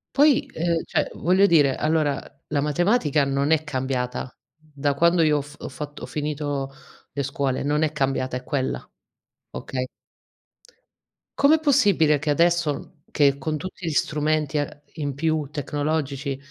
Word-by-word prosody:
Poi, 285 0 +5
ehm, 165 0 0
cioè, - - 0
voglio 185 +4 +4
dire, 145 -7 +4
allora 155 -2 +1 0.3
la 145 -2 0
matematica 150 - +2
non 140 +2 0
è 160 -1 +3
cambiata 130 -3 -3 0.2
da 145 -2 -3
quando 170 +3 +4
io 150 -2 +4
ho - - 0
fa 145 +1 -13
ho - - -4
fatto 145 +2 -8
ho - - -2
finito 145 -2 -3 0.4
le 140 - -2
scuole, 135 0 -1
non 150 +2 +1
è 155 - +1
cambiata, 135 -3 -1
è 125 - -9
quella. 130 -1 -2 0.6
Okay? 130 -1 -4 1.5
Com'è 290 +3 +6
possibile 195 - +4
che 155 0 0
adesso 170 +1 +1 0.2
che 140 -2 +3
con 155 +3 -2
tutti 185 +2 -6
gli - - 0
strumenti 150 0 0
e 145 0 -4
in 145 -3 -3
più 155 +1 0
tecnologici, 145 -1 -2
150 Hz, 150 wpm, -24 LUFS, 140-160 Hz, 1.5 s, Com'è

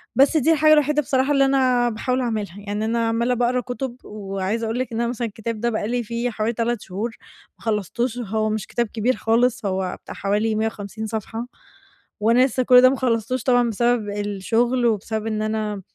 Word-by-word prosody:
بس 280 +4 +5
دي 310 +2 +3
الحاجة 310 0 +5
الوحيدة 300 0 +3
بصراحة 265 0 +1
اللي 275 -1 +4
أنا 255 -3 +3
باحاول 250 +3 -1
أعملها. 215 -6 -3
يعني 205 +1 -3
أنا 230 +1 0
عمّالة 235 +2 +1
باقرا 245 +1 +1
كُتب، 245 +1 -5
وعايزة 200 +2 -3
أقول 225 +2 -2
لِك، 255 -2 -3
إن 225 - -1
أنا 235 - 0
مثلًا 240 -1 -2
الكتاب 220 +1 -5
ده 235 +2 0
بقى 215 -2 -2
لي 245 +1 -1
فيه 235 +2 -2
حوالي 220 0 -2
3 235 -1 -1
شهور 205 +5 -4 0.5
ما - - -17
خلصتوش، 230 +3 -1
وهو 220 -2 -1
مش 215 -1 -3
كتاب 240 -1 -1
كبير 230 +4 0
خالص، 230 +2 +1
هو 190 -1 -2
بتاع - - -8
حوالي 210 +2 0
150 220 0 -3
صفحة، 225 +2 -5 0.7
وأنا 235 +4 +5
لسّه 260 0 0
كُل 250 0 +7
ده 255 - +7
ما 270 - -1
خلصتوش 235 -1 -1
طبعًا، 245 -2 +3
بسبب 235 -1 +1
الشغل، 205 +5 0
وبسبب 220 0 -1
إن 215 -1 -1
أنا 215 -2 -2
230 Hz, 195 wpm, -22 LUFS, 215-245 Hz, 0.7 s, كُل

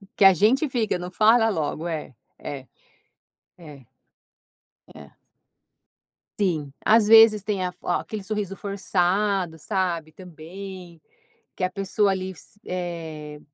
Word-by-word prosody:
que 200 - +4
a 195 - +9
gente 240 - +3
fica 230 -7 0
não 180 +1 -7
fala 225 +3 +4
logo 160 -2 -2
é, 155 -6 -5 0.2
é 135 -2 -7 0.9
é, 150 -7 -13 1.1
é. 70 -2 -13 1.3
Sim, 155 -8 -1
às 220 0 +5
vezes 220 -1 +7
tem 200 -2 -2
a - - -1
f - - -25
aquele 215 -2 -2
sorriso 200 -1 -4
forçado, 195 -2 0
sabe, 170 -3 -2
também, 180 0 -11 0.5
que - - -5
a 185 - +2
pessoa 195 +2 0
ali 190 0 -2
se 205 +4 -14
eh, 160 -4 -6
185 Hz, 125 wpm, -24 LUFS, 165-205 Hz, 1.3 s, a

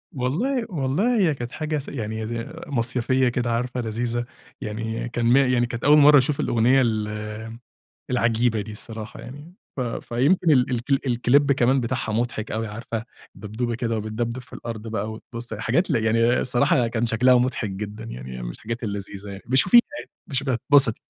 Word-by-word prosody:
والله 225 - -1
والله 175 - 0
هي 160 -5 +3
كانت 120 -2 -6
حاجة 155 -1 -2
س 140 - -6
يعني 110 -3 -4
ي 115 +1 -5
مصيفية 130 0 +1
كده 120 -1 -1
عارفة 125 +1 -1
لذيذة، 120 +2 -2 0.4
يعني 110 +2 -4
كان 120 0 -2
م 120 +3 +5
يعني 125 -3 +3
كانت 120 0 -6
أول 150 +2 +6
مرة 145 0 +8
أشوف 140 +2 +1
الأغنية 125 +4 +3
ال 110 0 -3 0.5
العجيبة 120 -2 +1
دي 110 +1 -7
الصراحة 110 +1 -8
يعني 145 +7 -11 0.2
ف - - -2
فيمكن 130 +8 +1
ال 130 -3 +4 0.4
الك 120 -1 -1
الClip 145 +1 +5
كمان 130 +1 +2
بتاعها 115 -2 -2
مضحك 115 -1 -2
أوي 110 +1 -2
عارفة 115 +1 -5 0.3
دبدوبة 110 +4 -4
كده 115 -2 -2
وبتدبدب 115 +3 -3
في - - -20
الأرض 115 -1 -6
بقى 110 0 -3
وتبُص 115 +1 -7
حاجات 125 - 0
ل - - +3
يعني 115 +2 +2
الصراحة 120 -1 +2
كان 115 +1 -1
شكلها 125 +3 +4
مضحك 120 -4 +1
جدًا، 105 +3 -6
يعني 65 - -7
من - - -4
الحاجات 115 - -6
اللذيذة 100 -1 -5
يعني 100 0 -8
ابقي 130 +2 +1
شوفيها 185 - +8 0.2
يعني - - -10 0.2
ابقي 135 - -5
شوفيها 135 -2 0
هتتبسطي، 135 -1 +4
120 Hz, 175 wpm, -24 LUFS, 110-130 Hz, 0.5 s, مرة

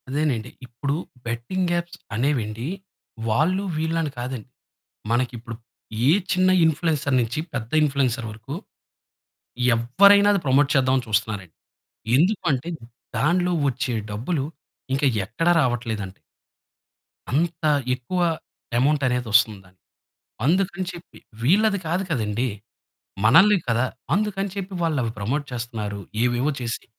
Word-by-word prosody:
అదేనండి. 130 -5 -1 0.2
ఇప్పుడు 140 +4 -2 0.3
betting 120 +11 -2
apps 170 0 -8 0.2
అనేవెండి 120 -2 -1 0.6
వాళ్ళు 170 - +2
వీళ్ళని 160 -1 -1
కాదండి, 125 -2 -5 0.6
మనకిప్పుడు 120 -1 -1 0.5
ఏ - - +7 0.2
చిన్న 185 +1 +3 0.2
ఇంప్ల్యూయన్సర్స్ 150 -4 +1
నుంచి 120 +4 -2 0.2
పెద్ద 120 -3 -4
ఇంప్ల్యూయన్సర్స్ 130 -5 0
వరకు 115 +6 -8 1.2
ఎవ్వరైనా 200 - +6
అది 200 - +2
ప్రమోట్ 140 +1 +4
చేద్దామని 130 -1 +2
చూస్తున్నారండి. 105 -5 -1 0.6
ఎందుకంటే 165 -4 +1 0.5
దానిలో 180 +4 +2 0.2
వచ్చే 130 0 -2 0.2
డబ్బులు 135 +8 -2 0.5
ఇంకా 135 +2 +1 0.2
ఎక్కడ 165 - -2
రావట్లేదండి. 115 -7 -2 1.1
అంత 160 +4 0 0.3
ఎక్కువ 130 +9 -4 0.6
అమౌంట్ 145 +2 +2
అనేదోస్తుందానికి 110 -6 +1 0.7
అందుకని 185 +3 +1
చెప్పి. 175 0 -12 0.2
వీళ్ళది 200 - +3
కాదు 175 +4 0
కదండీ! 115 -1 0 0.8
మనల్ని 195 - +7
కదా! 115 +2 +2 0.3
అందుకని 200 -1 -1
చెప్పి 195 -1 -5
వాళ్ళవి 140 -9 0
ప్రమోట్ 130 +9 -1
చేస్తున్నారు. 110 -4 -4 0.2
ఏవేవో 125 +4 +1
చేసి, 120 -1 -4
135 Hz, 100 wpm, -23 LUFS, 115-165 Hz, 1.2 s, ఏ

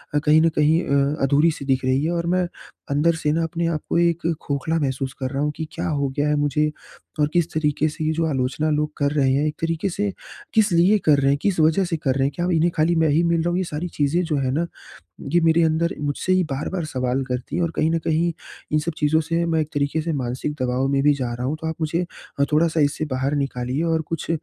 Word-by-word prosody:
अ, - - +4
कहीं 150 +1 +4
न 165 - +4
कहीं 155 +3 +3
अ, 140 +1 +1
अधूरी-सी 145 +1 +2
दिख 135 -1 +1
रही 130 +2 +2
है 165 - 0
और 170 -1 -1
मैं 180 0 +1 0.4
अंदर 160 +4 +2
से 150 -2 0
ना 165 +2 +1
अपने 165 +1 -2
आप 160 -2 -1
को - - +1
एक 170 -1 +1 0.2
खोखला 145 +3 -1
महसूस 135 -2 -2
कर 130 -1 -2
रहा 140 +1 -1
हूँ। 150 - 0
कि 160 - -4
क्या 170 +2 -3
हो 140 -2 0
गया 145 +1 +2
है 150 - +2
मुझे 145 +1 +1 0.5
और 150 - +4
किस 175 -2 +1
तरीके 155 -1 +1
से 155 +1 -6
ये 155 - +1
जो 165 +1 0
आलोचना 140 +1 -1
लोग 150 0 0
कर 145 -1 +1
रहे 140 -3 +2
हैं 140 +3 +1
एक 150 - -3
तरीके 165 +3 -1
से 200 +3 -1 0.4
किस 215 -2 +3
लिए 175 +5 +4
कर 150 -2 +5
रहे 135 0 +2
हैं? 140 - +2
किस 195 -5 0
वजह 160 +5 +4
से 170 -2 -2
कर 135 -4 0
रहे 135 - +1
हैं? 140 - -3
क्या 175 0 -1
इन्हें 165 +1 +2
खाली 165 +2 +2
मैं 160 -2 +3
ही 155 +4 +3
मिल 170 -1 +2
रहा 170 - 0
हूँ? 175 - 0
ये 185 - 0
सारी 165 0 -4
चीज़ें 150 +4 +1
जो 160 -3 -1
हैं 130 -2 0
ना 160 +5 0 0.6
ये 175 +4 +3
मेरे 165 +1 +4
अंदर 160 +1 +1
मुझसे 145 +5 -1
ही 185 0 +3
बार-बार 160 +5 -3
सवाल 130 -2 -1
करती 125 +3 -4
हैं। 175 - +1
और 170 - -1
कहीं 155 - +2
न 165 - +1
कहीं 165 +2 +1 0.4
इन 155 - +3
सब 165 +2 -3
चीज़ों 155 +1 +2
से 165 +2 -1
मैं 165 -1 +1
एक 155 - -4
तरीके 145 +2 0
से 165 +1 -2
मानसिक 125 +5 -3
दबाव 130 +1 0
में 135 0 +1
भी 145 0 +5
जा 125 -4 -3
रहा 125 +1 -3
हूँ। 150 +3 -2
तो 160 - -3
आप 160 - -3
मुझे 165 +3 0 0.3
अ, - - +4
थोड़ा-सा 160 +1 +2
इससे 145 +2 +1
बाहर 135 +3 0
निकालिए 125 +3 -3
और 160 - +1
कुछ 165 -1 -4
155 Hz, 260 wpm, -22 LUFS, 140-165 Hz, 0.6 s, कर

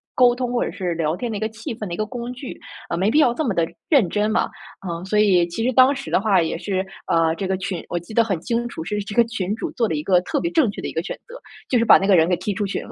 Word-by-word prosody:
沟 245 -1 +5
通 250 -1 -2
或 245 - 0
者 - - -3
是 180 -2 -3
聊 160 -1 0
天 235 +5 -4
的 210 - -3
一 - - -4
个 220 - -1
气 225 +4 -7
氛 215 -3 -6
的 170 - -5
一 - - -4
个 215 - -1
工 245 +1 -6
具。 255 +1 -8 0.3
呃 170 - -1
没 195 +4 +2
必 295 - +3
要 250 -6 +4
这 310 +5 -2
么 225 - 0
的 170 -2 +2 0.2
认 260 - +4
真 210 +1 0
嘛。 225 +1 +1 0.3
啊， 170 -3 -5
所 210 +2 +1
以， 190 -5 +4
其 175 +6 -4
实 255 - +2
当 260 +3 +6
时 275 0 -7
的 - - +3
话 195 -3 +3
也 165 - -2
是， 190 +1 -2 0.2
呃， 165 -1 +2
这 195 0 -3
个 190 - 0
群 185 -2 -4
我 175 - -2
记 175 +6 -12
得 230 +1 +4
很 195 -6 -2
清 240 +3 -1
楚， 200 - -6
是 210 +4 -3
这 200 0 -6
个 235 - +6
群 210 -3 -3
主 - - -4
做 230 -2 0
了 160 - -2
一 150 - -3
个 180 +1 +4
特 285 - -2
别 340 - -1
正 320 -9 +3
确 - - -8
的 - - -4
一 - - -6
个 165 - -1
选 - - -5
择， 485 - -11 0.3
就 250 - +3
是 230 - +2
把 - - +8
那 195 - -1
个 200 - +6
人 165 -1 +4
给 180 - +3
踢 195 +3 -3
出 205 +1 -2
群 195 - -3
了。 - - -11
210 Hz, 360 characters per minute, -22 LUFS, 180-240 Hz, 0.3 s, 把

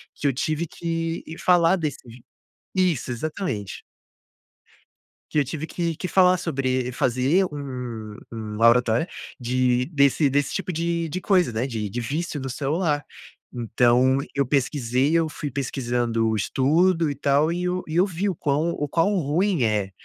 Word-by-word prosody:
que - - -7
eu 140 - +2
tive 155 +5 -1
que 165 0 -3
falar 175 0 +4
desse 155 -6 -3 0.8
isso 175 -9 +1
exatamente. 120 - -4 1.5
Que 150 - +1
eu 145 - +2
tive 155 +3 -4
que 170 -2 -2
que 185 - -4
falar 185 0 +4
sobre 130 -6 -1
fazer 130 +8 +2
um 125 -7 -6 0.2
um 110 -2 -6
oratória 120 +4 +4 0.3
de 125 0 +1
desse 140 -1 +3
desse 145 0 0
tipo 195 -2 -2
de 170 +1 -1
de 185 +5 -4
coisa, 185 -9 +3
né. 115 +3 -1
De 110 -4 -3
de 120 +5 -4
vício 150 +5 -3
no 135 0 -5
celular. 145 +3 -1 0.5
Então 125 +2 +3 0.2
eu 140 - +2
pesquisei, 135 0 +1
eu 165 -1 +3
fui 150 -1 -5
pesquisando 120 -4 -1
o 110 - 0
estudo, 160 - +2
e - - -5
tal, 140 +3 +2
eh, 170 - -1
eu 180 0 -1
e 155 - -5
eu 180 +3 +5
vi 195 +2 -2
o 180 - -2
quão 150 +4 0
o 145 -3 -3
quão 165 +6 +2
ruim 170 +1 +1
é, 105 -3 0
140 Hz, 160 wpm, -24 LUFS, 125-165 Hz, 1.5 s, eu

